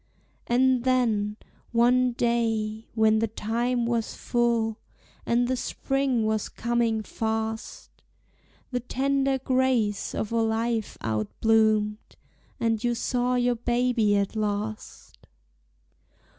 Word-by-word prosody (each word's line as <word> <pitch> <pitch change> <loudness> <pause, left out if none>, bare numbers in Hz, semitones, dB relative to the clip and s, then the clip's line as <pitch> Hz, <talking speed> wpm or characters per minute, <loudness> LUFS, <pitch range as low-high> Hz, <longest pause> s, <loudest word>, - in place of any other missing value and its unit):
And 255 0 +3
then, 225 -5 +1 0.3
one 245 +1 +3
day, 225 -2 -1
when 220 -1 +4
the 225 - +1
time 235 +3 -1
was 230 -1 -1
full, 235 -2 0 0.5
And 240 +1 +2
the 260 - 0
spring 265 -2 -1
was 215 -1 -1
coming 235 -2 0
fast, 220 +1 -4 0.8
The 250 - 0
tender 270 +2 0
grace 255 -5 0
of 215 - -3
a 230 0 +2
life 225 0 -1
outbloomed, 210 - +1 0.4
And 225 -1 0
you 240 -1 +1
saw 250 +1 0
your 245 0 +2
baby 240 -3 +1
at 200 +2 -1
last. 215 0 -4
230 Hz, 105 wpm, -26 LUFS, 220-245 Hz, 0.8 s, when